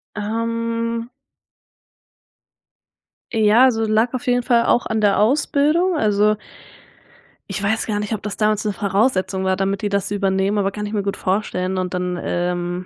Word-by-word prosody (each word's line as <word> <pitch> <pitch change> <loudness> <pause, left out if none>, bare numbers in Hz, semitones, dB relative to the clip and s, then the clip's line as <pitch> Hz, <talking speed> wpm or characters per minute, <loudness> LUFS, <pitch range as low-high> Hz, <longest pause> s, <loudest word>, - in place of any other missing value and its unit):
Ähm 230 +2 -2 2.2
ja, 220 +1 +4
also 225 -4 +2
lag 220 +3 +2
auf 255 +1 -4
jeden 245 -1 +2
Fall 235 -2 +3
auch 240 - +2
an 220 0 -1
der 205 -2 +3
Ausbildung, 300 - +2
also 210 -4 +2 1.2
ich 200 - -3
weiß 220 +2 0
gar 210 -2 -1
nicht, 210 +1 -3
ob 210 - -3
das 210 -1 -5
damals 215 -1 +1
'ne 210 -2 -1
Voraussetzung 195 -1 0
war, 190 0 +1
damit 195 +1 -1
die 205 - -1
das 200 -1 -1
übernehmen, 195 0 0
aber 195 -1 +1
kann 210 +1 -5
ich 205 - -6
mir 210 - 0
gut 200 0 -3
vorstellen 185 -1 -1
und 185 0 -3
dann 180 -1 -2
ähm 175 0 -2
210 Hz, 165 wpm, -20 LUFS, 195-230 Hz, 2.2 s, ja